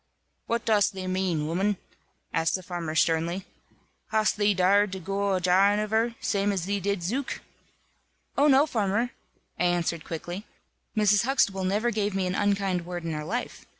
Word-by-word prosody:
"What 235 0 -1
dost 210 -2 +3
thee 190 -1 -5
mane, 185 -3 0
'ooman?" 185 +6 0 0.6
asked 165 0 +1
the 185 - -5
farmer, 170 -3 -4
sternly, 165 +3 +1 0.6
"hast 215 0 +2
thee 205 -1 +3
darr'd 195 +2 +3
to 190 - -4
goo 195 +2 -1
a 185 - +1
jahing 190 +3 +4
of 210 0 -2
her, 230 +1 +1
zame 200 0 +1
as 185 -4 -2
thee 200 +1 -1
did 200 -1 -1
Zuke?" 250 +10 -2 0.9
"Oh, 285 +2 +4
no, 280 0 +6
farmer!" 225 -2 0 0.5
I - - +2
answered, 170 -2 0
quickly, 175 +5 -6 0.5
"Mrs. 210 +1 +4
Huxtable 200 -8 +1
never 210 +5 +1
gave 205 -2 -1
me 190 -1 0
an 180 - -1
unkind 195 -3 +1
word 175 0 -6
in 165 - -3
her 150 0 -3
life. 235 +10 -4
195 Hz, 175 wpm, -27 LUFS, 180-210 Hz, 0.9 s, no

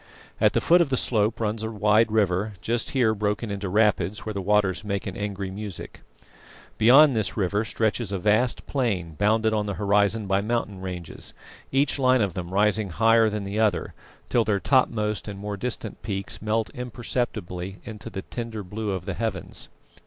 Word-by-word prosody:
At - - +4
the - - +2
foot 175 +1 +5
of 165 - +1
the 130 - +1
slope 110 -1 +1
runs 110 0 -1
a 110 - -3
wide 105 +1 +3
river, 105 -1 +1
just 115 +6 -1
here 120 -5 +2
broken 105 +1 -2
into 100 -1 -3
rapids 105 -1 +1
where 110 - -3
the 100 - -3
waters 100 -1 +1
make 100 -2 -3
an 95 - -5
angry 100 -2 -4
music. 100 -1 -7 0.8
Beyond 135 +5 +7
this 110 -1 -1
river 100 +1 +1
stretches 110 -1 -1
a 100 - -1
vast 110 +6 +1
plain 100 - -1
bounded 110 +5 +2
on 105 -1 0
the 100 - -2
horizon 105 +1 +2
by 95 0 +1
mountain 105 -3 -2
ranges, 90 -3 -6 0.4
each 140 +1 +1
line 130 -1 +4
of 100 -4 0
them 85 -1 -5
rising 105 +1 +2
higher 115 +4 +4
than 105 -1 -3
the 100 +2 -3
other 105 -7 +1 0.3
till 120 - +2
their 105 -2 +1
topmost 110 -4 +1
and 100 -1 -6
more 105 +1 -4
distant 125 +4 -4
peaks 95 -2 -4
melt 110 -2 0
imperceptibly 110 -7 -4
into 110 -3 -8
the 95 - -6
tender 115 -3 -6
blue 105 +3 -4
of 95 -3 -3
the 100 - -3
heavens. 100 -4 -3
105 Hz, 180 wpm, -25 LUFS, 100-115 Hz, 0.8 s, Beyond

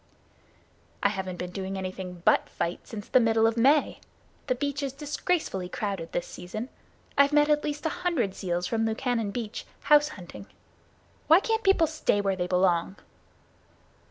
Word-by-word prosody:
"I 200 - +5
haven't 190 -2 -4
been 180 0 -5
doing 190 +1 -4
anything 185 -2 -6
but - - +4
fight 170 - -4
since 210 -2 -7
the 255 - +5
middle 225 -1 +3
of 225 0 +2
May. 275 +5 +3 0.5
The 255 - +1
beach 285 +2 -2
is 275 -2 -3
disgracefully 295 - -2
crowded 195 -6 -4
this 175 - -2
season. 215 +8 -7 0.5
I've 280 +1 +5
met 295 0 +4
at 300 0 +3
least 295 +1 -4
a - - +2
hundred 320 - 0
seals 175 -2 -2
from 225 +1 0
Lukannon 225 -1 -1
Beach, 225 0 -5 0.2
house 295 0 +5
hunting. 195 - -10 0.8
Why 325 +3 +8
can't 450 +1 -1
people 390 -4 +4
stay 310 -9 0
where 195 -1 0
they 180 -1 -2
belong?" 180 0 +2
225 Hz, 160 wpm, -27 LUFS, 190-295 Hz, 0.8 s, Why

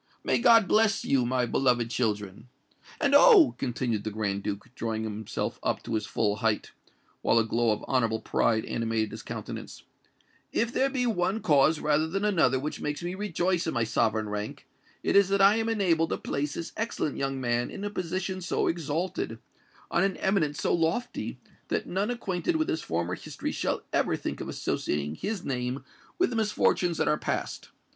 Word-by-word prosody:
May - - +2
God 230 -4 +6
bless 215 -1 +3
you, 125 -3 +2
my 125 0 +1
beloved 120 -2 +1
children! 105 -1 -2 0.5
And, 280 - +2
oh!" 395 - +8
continued 120 -4 -1
the 110 - -2
Grand 100 -2 -2
Duke, 105 +4 -5
drawing 110 -2 -3
himself 110 -1 -4
up - - -1
to 115 - -5
his 110 -1 -1
full 105 0 0
height, 110 -1 0 0.5
while 115 - +3
a 115 - +4
glow 115 +1 +1
of 105 - 0
honourable 115 -4 +1
pride 110 0 +1
animated 115 -2 -1
his - - -7
countenance, - - -7 0.7
"if 235 +1 0
there 270 - +2
be 260 -2 -1
one 205 -2 0
cause 150 -3 +4
rather 155 +1 +2
than 195 +5 -1
another 160 -11 +3
which 150 +3 -4
makes 150 +3 -3
me 175 +1 -3
rejoice 185 -3 -1
in 160 - -2
my 115 - +2
sovereign 110 -1 +1
rank, 105 0 -5 0.4
it - - +1
is 200 -1 +6
that 200 0 +2
I 200 +3 +6
am 225 0 0
enabled 175 -7 +2
to - - -1
place 145 +1 -3
this 165 - -5
excellent 215 - -2
young 135 0 -2
man 120 -1 0
in - - -7
a 205 - -3
position 185 0 -3
so 175 - 0
exalted—on 165 -1 -3
an 195 0 0
eminence 155 -7 +1
so - - +1
lofty—that 170 +9 -2
none 195 +5 -1
acquainted 235 - -1
with 315 0 0
his 160 - -1
former 85 +2 -2
history - - -5
shall - - -2
ever - - +2
think - - -5
of - - -5
associating 75 0 -2
his 200 - -4
name 125 0 -3 0.3
with 365 -6 +2
the - - -3
misfortunes 205 -5 +1
that - - +1
are 150 - +2
past! - - -3
150 Hz, 180 wpm, -28 LUFS, -, 0.7 s, oh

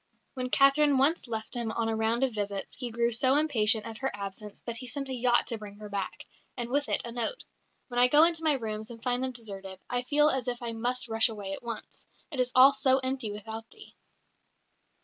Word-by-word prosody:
When 255 -2 -3
Catherine 275 +1 +4
once 280 +3 +2
left 220 -2 -5
him 235 -3 -2
on 230 -1 -1
a 225 - 0
round 225 +3 +1
of 260 -3 +1
visits, 200 -2 -4
he 250 -2 -5
grew 235 +1 0
so 260 +4 +2
impatient 230 -8 +4
at 225 -1 -8
her 270 - -1
absence 200 +1 -7
that 235 -1 -4
he 255 +1 -6
sent 275 +1 -2
a - - -2
yacht 245 -1 +3
to 230 -3 -2
bring 205 -1 -9
her 210 0 -10
back, 200 -2 -4 0.3
and 240 0 -4
with 285 +1 +1
it - - +1
a 235 - -6
note: 240 - -3 0.4
"When 245 -1 -2
I 250 - +7
go 295 +4 +6
into 330 -1 +2
my 315 -2 +3
rooms 220 -4 -4
and 230 -1 -11
find 250 0 0
them 260 - -1
deserted, 195 -5 -7
I 245 0 +1
feel 295 +4 +3
as 265 -1 -2
if 245 -1 -2
I 235 -1 -4
must 245 +2 -1
rush 225 +1 +3
away 205 -3 -6
at - - -6
once. 235 -2 -8 0.2
It 280 - -5
is 250 0 +1
all 265 +2 +8
so 265 -1 +3
empty 260 -4 -2
without 220 +2 -7
thee." 425 - -15
240 Hz, 230 wpm, -29 LUFS, 220-265 Hz, 0.4 s, all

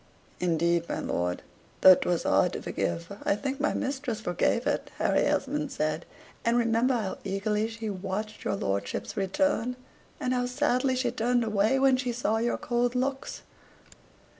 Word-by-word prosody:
"Indeed, 170 0 +1
my - - -1
lord, 90 0 -2 0.4
though 190 - +11
'twas 175 -1 0
hard - - +3
to - - -4
forgive, 170 +4 -3
I - - +2
think 270 +6 -3
my 300 - +1
mistress 265 -4 -2
forgave 220 +5 0
it," 290 0 -1
Harry - - +2
Esmond 295 -2 0
said; 155 - -2 0.4
"and 235 +1 +2
remember 235 +2 +2
how 210 -5 -2
eagerly 210 +2 0
she 225 0 -6
watched 205 +2 -4
your - - 0
lordship's 100 - -3
return, 245 +5 0 0.4
and 255 - 0
how 245 0 0
sadly 260 0 +1
she 250 -1 0
turned 245 0 +1
away 215 +3 +2
when 265 -1 +4
she 250 -1 -1
saw 225 -2 0
your 235 +1 0
cold 240 0 0
looks." 270 +2 -2
230 Hz, 160 wpm, -28 LUFS, 195-255 Hz, 0.4 s, though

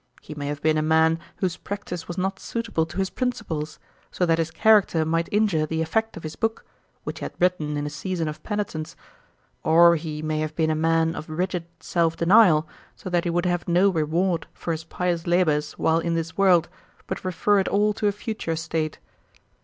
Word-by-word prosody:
He - - -9
may 145 -1 -5
have 145 0 -4
been 155 -1 +3
a - - +1
man 160 +1 +3 0.2
whose 180 -3 -2
practice 195 -4 -6
was 175 - -6
not 190 +1 -1
suitable 200 -8 -2
to 160 - -10
his 190 -1 0
principles, 220 - -3 0.3
so 180 - 0
that 165 -1 +2
his 165 -1 0
character 195 -3 +4
might 165 +1 0
injure 205 -8 +2
the 160 +1 -1
effect 220 +7 -1
of 170 - -9
his 155 0 -6
book, 225 0 -2 0.4
which - - -5
he - - -4
had - - -7
written 160 -5 +1
in 145 - -2
a - - -2
season 165 +2 -3
of 155 0 -6
penitence. 200 -7 -4 0.7
Or 170 +1 +6
he 155 -1 -5
may 155 0 -1
have 155 0 -3
been 160 -1 +1
a - - +1
man 165 +1 +2
of 155 - -7
rigid 180 +2 -2
self 165 -1 0
denial, 170 -4 +5 0.3
so 185 - -8
that 175 0 +1
he - - +1
would 175 +1 0
have 175 -1 -1
no 180 +3 +4
reward 165 +1 0
for 170 - -4
his 160 0 -4
pious 175 0 -2
labours 155 -4 +2
while 160 0 +2
in 170 0 -1
this 165 0 -3
world, 180 -4 +4 0.4
but - - -5
refer 190 +3 +2
it 190 - 0
all 210 +1 +2
to 210 +1 -1
a - - +3
future 205 -5 -4
state.' 160 -1 -2
165 Hz, 210 wpm, -24 LUFS, 160-185 Hz, 0.7 s, Or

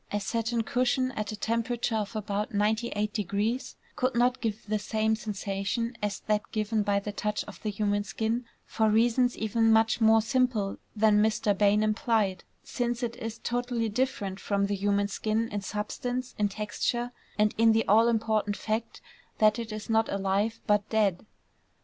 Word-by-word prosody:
A 205 - 0
satin 230 +3 -1
cushion 255 +1 +1
at 215 -3 -4
a - - -4
temperature 230 +2 -1
of 210 +1 -3
about 210 0 -2
98° 210 +1 -1 0.2
could 255 0 0
not 250 +2 +2
give 220 -2 -3
the 215 0 -1
same 220 +1 0
sensation 210 +2 -3
as 205 -2 -2
that 210 -1 -1
given 215 0 0
by 200 -1 +1
the 205 +1 -5
touch 210 +1 -2
of 210 - -12
the 215 - -2
human 205 0 0
skin 225 +4 -2 0.2
for 220 -1 +1
reasons 240 +3 +3
even 225 +1 +2
much 225 +1 +3
more 220 0 +5
simple 235 -5 0 0.2
than 210 -1 +4
Mr. 215 -1 +2
Bain 205 +1 +3
implied, 215 -3 +1 0.2
since 240 0 -2
it 235 0 -2
is 225 0 -5
totally 240 -1 -1
different 205 -5 -2
from 200 -1 0
the 200 0 -1
human 200 +1 +1
skin 220 +2 -1
in 205 -1 -3
substance, 245 +5 -4
in 205 -1 +2
texture, 215 +4 -2 0.3
and 210 0 +3
in 225 0 +6
the 225 0 +2
all 225 +3 +5
important 220 -2 +1
fact 220 +1 -3 0.4
that 215 +2 +4
it 230 -1 -5
is 215 0 -6
not 225 -1 +2
alive, 200 +3 0
but 210 -1 +2
dead. 210 -3 +1
215 Hz, 170 wpm, -28 LUFS, 205-230 Hz, 0.4 s, in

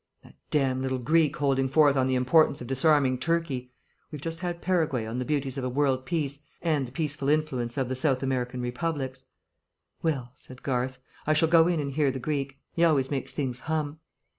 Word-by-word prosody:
"That - - -16 0.2
damned 135 -3 +1
little 130 0 -1
Greek 155 +4 +2
holding 135 -2 +2
forth 145 +1 +4
on 130 -1 +2
the 130 - +1
importance 140 +4 +4
of 125 - -6
disarming 135 0 +3
Turkey. 145 -6 -1 0.4
We've 150 - -7
just 165 +3 -4
had 175 -1 -3
Paraguay 160 -11 0
on 115 +3 -4
the 125 - -2
beauties 140 -2 -1
of - - -4
a 130 - -1
world 130 -1 +1
peace 145 -5 -1 0.2
and 150 -6 0
the - - -12
peaceful 145 0 -2
influence 140 -6 0
of 135 -2 0
the 130 - -2
South 130 0 +1
American 125 -1 -1
republics." 130 +1 -3 0.8
"Well," 135 -7 -1
said 130 -2 -13
Garth, 130 -1 -1 0.3
"I 155 - +4
shall 155 +1 +3
go 165 0 +6
in 175 -2 +1
and 140 -1 -2
hear 145 0 +2
the 130 - -3
Greek. 140 0 -3 0.2
He 170 - +1
always 145 -5 +3
makes 135 -2 -2
things 130 -4 -2
hum." 155 0 -2
140 Hz, 200 wpm, -27 LUFS, 130-155 Hz, 0.8 s, go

